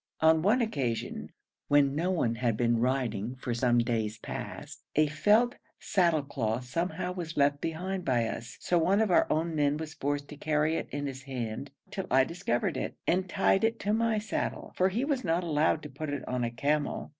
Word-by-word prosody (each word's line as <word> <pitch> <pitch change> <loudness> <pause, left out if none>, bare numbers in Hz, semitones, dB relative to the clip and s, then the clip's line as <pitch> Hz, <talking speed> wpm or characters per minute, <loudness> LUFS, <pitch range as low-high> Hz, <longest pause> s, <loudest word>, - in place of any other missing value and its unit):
On 160 0 +5
one 215 +8 +3
occasion, 135 - -3 0.4
when 145 -1 +4
no 165 +5 0
one 160 -11 +1
had 115 -2 0
been 120 -1 +2
riding 125 -2 0
for 125 -1 -3
some 120 0 +2
days 115 -2 0
past, - - -7
a 155 - +5
felt 210 +11 +3 0.2
saddle 170 -7 +2
cloth 125 -3 -2
somehow 170 +6 -2
was 170 -3 -6
left 145 0 +3
behind 180 +3 -3
by 120 -5 +2
us, 115 +1 -6
so 175 - +1
one 190 +5 +3
of 220 -3 +2
our - - +4
own 165 +2 0
men 145 -1 +2
was 160 0 -6
forced 145 0 -2
to 150 - -9
carry 155 +1 +1
it - - -3
in 145 0 -3
his 135 -1 -5
hand 130 -1 -5 0.2
till 190 -2 -4
I 130 +1 +5
discovered 130 -6 -1
it, - - -3
and 185 +1 +1
tied 195 +1 +2
it 225 +1 +1
to 205 +1 0
my 225 0 +2
saddle, 215 +1 -3
for 185 +1 +3
he 230 +8 -1
was 280 -3 -1
not 170 0 +1
allowed 155 -1 +1
to 150 - -7
put 150 +3 -5
it 145 -2 -4
on 125 -1 -1
a 120 - 0
camel. 145 +5 -1
150 Hz, 200 wpm, -29 LUFS, 125-180 Hz, 0.4 s, On